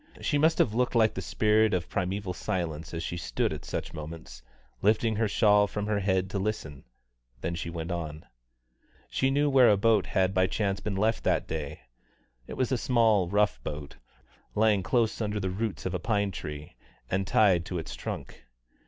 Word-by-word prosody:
She 145 - 0
must 160 +2 +3
have 110 - +2
looked 125 +2 0
like 110 -2 +4
the 95 - -4
spirit 110 +3 +2
of 90 - -2
primeval 95 0 -2
silence 80 -4 -3
as 85 0 -4
she 85 - -4
stood - - -1
at - - -7
such - - -5
moments, 75 -5 -8 0.4
lifting 110 +2 +2
her 110 0 +2
shawl 105 0 +4
from 105 0 -4
her 105 -1 0
head 95 -1 +1
to 100 - -1
listen; 95 -9 -4 0.6
then 85 - -2
she 85 0 -4
went 85 +1 -5
on. 80 -3 -5 0.9
She 130 - +1
knew 145 +2 +2
where 135 -3 +6
a 105 - +5
boat 110 -1 +3
had 95 0 +1
by 95 -1 +3
chance 100 -1 -1
been 100 +1 -3
left 110 +3 +1
that - - +1
day; 75 -2 -5 0.7
it - - -7
was 130 0 0
a 130 - +1
small 110 -7 +3
rough 100 -10 +1
boat, 75 -1 -6 0.6
lying 105 -2 +3
close 115 +3 0
under 105 -1 -1
the 95 -2 -2
roots 105 +2 -3
of 95 - -2
a 90 - -1
pine 100 0 0
tree, 75 -4 -7 0.4
and 95 0 0
tied 95 -6 +4
to 90 - -4
its 80 - -5
trunk. - - -7
100 Hz, 190 wpm, -28 LUFS, 85-110 Hz, 0.9 s, where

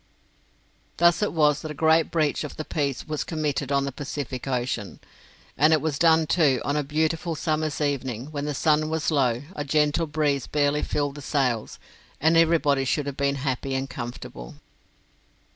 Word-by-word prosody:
Thus 170 +2 +4
it 210 - +1
was 150 -3 +2
that 155 - -6
a 150 - -6
great 160 +1 +3
breach 155 -3 0
of 150 - -7
the 155 - -4
peace 140 -3 -2
was 155 -1 -2
committed 150 -4 -2
on 140 0 +2
the 140 - -3
Pacific 135 -1 -5
Ocean; 120 -5 -2 0.6
and 155 +4 +4
it 155 - +4
was 150 -2 -2
done, 165 -1 +5
too, 150 -6 +3
on 145 - 0
a 150 - +2
beautiful 160 +3 -1
summer's 155 -1 -1
evening, 135 -3 -2
when 145 -1 -4
the 150 -1 -2
sun 155 +1 +2
was 160 0 -1
low, 130 -4 +1
a 145 - -3
gentle 150 +3 +1
breeze 145 -3 0
barely 145 0 +1
filled 145 -1 -1
the 145 - -9
sails, 130 -6 -1 0.4
and 160 +3 +3
everybody 160 -4 +3
should 140 +2 0
have 140 -1 -4
been 140 0 +1
happy 135 0 -2
and 135 0 -3
comfortable. 120 - -7
145 Hz, 175 wpm, -25 LUFS, 135-155 Hz, 0.6 s, done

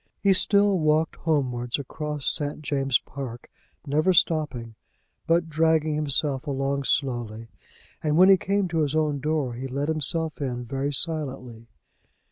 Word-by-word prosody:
He 200 -1 +4
still 200 0 +3
walked 155 +1 +2
homewards 125 -7 -1
across 150 +1 -5
St. 145 +1 -1
James's 135 -3 +1
Park, 125 -4 -8 0.3
never 155 +6 +2
stopping, 145 -9 +1 0.5
but 165 0 +2
dragging 160 -1 +2
himself 145 -1 -1
along 140 0 -1
slowly, 120 -5 -1 0.5
and 150 0 +1
when 185 +2 +7
he 195 - +8
came 195 +1 0
to 165 -1 -1
his 150 -1 0
own 150 -2 +1
door 150 -3 -1
he 130 +3 -5
let 140 +3 -2
himself 160 0 -2
in 125 -3 -3
very 135 +4 -2
silently. 130 -7 -4
145 Hz, 140 wpm, -25 LUFS, 130-160 Hz, 0.5 s, he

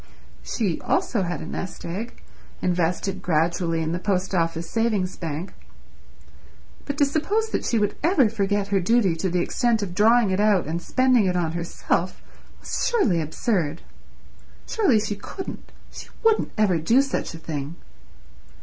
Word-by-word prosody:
She, 195 -9 -2
also, 350 - 0
had 175 -1 -3
a - - -6
nest 185 - -6
egg, 200 +8 -6 0.4
invested 180 +2 -1
gradually 165 0 +1
in 160 - -2
the 175 - -2
Post 190 -1 -1
Office 165 -1 0
Savings 215 -5 0
Bank, 165 +2 -5 1.3
but 285 0 -4
to 285 - +5
suppose 390 +10 0
that - - -1
she 235 - +1
would 205 -1 +1
ever 310 - +4
forget 205 -2 -1
her 200 -1 +2
duty 195 -2 +2
to 190 - -1
the 175 0 +1
extent 235 +2 +1
of 180 -3 -5
drawing 220 +2 +4
it 185 - 0
out 205 -4 +3
and 165 +3 -3
spending 255 -1 +3
it 180 - 0
on 170 -3 0
herself 170 +1 -2 0.4
was - - -2
surely 235 - +2
absurd. 165 0 -1 0.8
Surely 345 - +3
she 210 -1 -2
couldn't, 380 - -8 0.2
she - - -9 0.2
wouldn't 450 -1 +3
ever 195 -6 +3
do 230 - +4
such 275 -10 -3
a - - -6
thing? 155 -1 -5
195 Hz, 160 wpm, -24 LUFS, 170-235 Hz, 1.3 s, to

